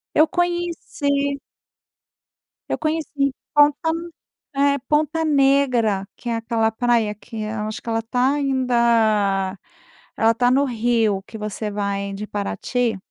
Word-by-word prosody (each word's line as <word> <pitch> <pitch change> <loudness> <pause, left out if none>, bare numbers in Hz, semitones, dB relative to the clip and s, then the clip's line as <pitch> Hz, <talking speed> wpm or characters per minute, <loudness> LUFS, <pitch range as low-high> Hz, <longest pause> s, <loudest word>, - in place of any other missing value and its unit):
Eu 310 - +6
conheci 330 -5 -1 1.3
Eu - - 0
conheci 315 -1 -2 0.4
Ponta, 295 +2 +4 0.7
é, 280 0 +3
Ponta 310 +2 +1
Negra, 270 -9 +2
que 240 - -7
é 230 - 0
aquela 225 -1 0
praia 230 -2 +1
que, 220 +2 -11
eu 215 0 -3
acho 215 - -5
que, - - -7
ela 225 0 0
tá 250 +4 +1
ainda, 230 -8 +2 0.6
ela 225 +1 +4
tá 245 +1 +3
no 275 +2 +4
Rio, 225 -4 +1
que 220 - -9
você 210 0 -4
vai 200 -1 -2
de 205 +2 -5
Paraty. 220 +3 -2
235 Hz, 130 wpm, -22 LUFS, 215-280 Hz, 1.3 s, Eu